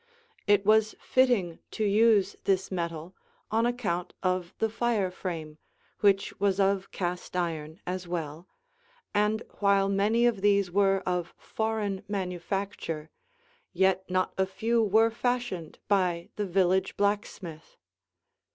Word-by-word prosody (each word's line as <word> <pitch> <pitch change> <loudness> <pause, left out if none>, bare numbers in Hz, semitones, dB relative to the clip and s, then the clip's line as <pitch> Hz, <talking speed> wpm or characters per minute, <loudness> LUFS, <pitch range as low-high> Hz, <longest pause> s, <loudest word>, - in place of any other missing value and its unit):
It 205 -1 +4
was 215 +1 +4
fitting 240 -10 +2
to 215 - -2
use 205 -1 +4
this 190 -1 +1
metal, 170 -1 -4 0.4
on 225 +2 +2
account 200 -8 -2
of 185 -2 0
the 225 - +1
fire 220 -4 0
frame, 160 -5 -6 0.4
which 200 -1 +3
was 200 -1 +1
of 195 0 +2
cast 180 0 -4
iron 165 -2 -3
as 180 0 -4
well, 165 0 -5 0.7
and 210 +2 +1 0.2
while 200 -1 +3
many 210 +4 +2
of 230 -5 +1
these 200 -2 +3
were 195 0 +3
of 180 -1 -2
foreign 220 -3 -2
manufacture, 185 -4 -3 0.6
yet 190 0 +2
not 185 0 0
a 190 - +3
few 225 +5 +1
were 220 +2 +4
fashioned 240 -8 -2
by 180 -4 +1
the 205 -1 -2
village 190 +1 +1
blacksmith. 200 -5 -2
195 Hz, 125 wpm, -28 LUFS, 180-210 Hz, 0.7 s, It